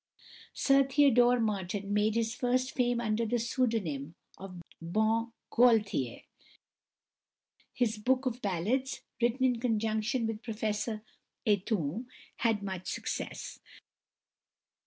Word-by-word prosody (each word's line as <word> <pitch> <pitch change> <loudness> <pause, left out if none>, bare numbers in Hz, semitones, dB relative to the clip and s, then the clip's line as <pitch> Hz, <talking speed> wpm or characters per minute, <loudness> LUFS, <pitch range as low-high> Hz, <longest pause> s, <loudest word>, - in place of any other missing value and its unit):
Sir 275 0 +4
Theodore 255 -3 +4
Martin 205 -2 -2
made 210 +1 +2
his 230 -1 0
first 255 +1 0
fame 245 -2 +1
under 225 -1 0
the 235 +2 0
pseudonym 220 - -1 0.2
of 185 -2 -9 0.2
Bon 220 +7 +1 0.2
Gaultier. 215 - +3 1.5
His 225 -3 0
"Book 260 +4 +1
of 250 -1 -2
Ballads," 215 +9 -1 0.2
written 240 +3 +2
in 250 -2 +2
conjunction 225 +1 0
with 225 -1 -3
Professor 215 -1 -3 0.4
Aytoun, 205 - 0 0.3
had 225 -4 +1
much 190 -2 -5
success. - - -4
225 Hz, 105 wpm, -31 LUFS, 210-245 Hz, 1.5 s, Sir